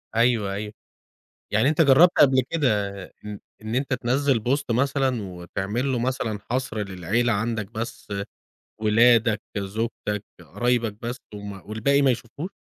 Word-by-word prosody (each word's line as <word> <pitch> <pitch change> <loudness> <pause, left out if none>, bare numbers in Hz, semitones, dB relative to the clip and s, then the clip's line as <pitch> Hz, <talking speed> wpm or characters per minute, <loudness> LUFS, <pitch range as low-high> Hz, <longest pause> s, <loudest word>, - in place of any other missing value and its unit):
أيوه، 115 -4 +2
أيوَه. 105 +1 -5 0.8
يعني 110 +6 +3
أنتَ 155 +1 +2
جرّبت 155 +4 +7
قبل 130 -2 +6
كده 150 -6 +2 0.4
إ 105 -1 -10 0.2
إن 110 +2 -4
أنتَ 135 +1 0
تنزّل 130 +1 +1
بوست 125 +3 -1
مثلًا 130 0 +1
وتعمل 95 +7 -3
له 125 - 0
مثلًا 115 -4 -2
حصر 130 -3 -1
للعيلة 100 +6 0
عندَك 110 -1 -2
بس، 115 +2 -6 0.7
ولادَك، 110 0 +4 0.2
زوجتَك، 105 0 -3 0.2
قرايبَك 120 -3 0
بس، 120 +2 -4 0.2
وم 105 0 -6
والباقي 115 +7 +1
ما 135 -2 +5
يشوفوش؟ 125 - -5
115 Hz, 135 wpm, -24 LUFS, 105-130 Hz, 0.8 s, جرّبت